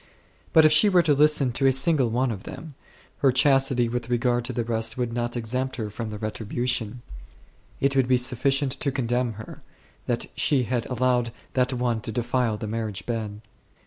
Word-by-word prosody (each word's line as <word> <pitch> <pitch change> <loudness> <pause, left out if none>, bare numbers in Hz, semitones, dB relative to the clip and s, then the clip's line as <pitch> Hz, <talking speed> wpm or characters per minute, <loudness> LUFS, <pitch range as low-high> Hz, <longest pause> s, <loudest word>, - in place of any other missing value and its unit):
But 160 -1 +6
if 155 - +6
she 155 +7 +6
were 180 -3 +4
to 155 -2 +3
listen 145 -2 +4
to 135 +3 +1
a - - +5
single 135 -1 +2
one 125 +2 0
of 100 -4 -6
them, 160 -2 -9 0.5
her 135 - +4
chastity 135 -2 +3
with 120 0 -4
regard 120 0 +1
to 130 - -3
the 120 -1 -2
rest 115 0 -3
would 120 -2 -2
not 120 0 -2
exempt 125 +3 -2
her 110 -4 -5
from 110 +1 -5
the 105 - -6
retribu 110 +3 -4
tion; 120 -1 -2 0.8
it 140 0 +1
would 130 -2 +3
be 130 0 +4
sufficient 130 +2 +1
to 140 - -1
condemn 125 -2 -1
her, 110 +1 -10 0.5
that - - -1
she 135 -4 +2
had 120 0 -2
allowed 125 -1 0 0.2
that 125 0 +1
one 120 -2 -1
to 110 - -3
defile 120 -1 -1
the 110 - -6
marriage 110 -2 -4
bed. 110 -3 -4
125 Hz, 195 wpm, -25 LUFS, 115-135 Hz, 0.8 s, But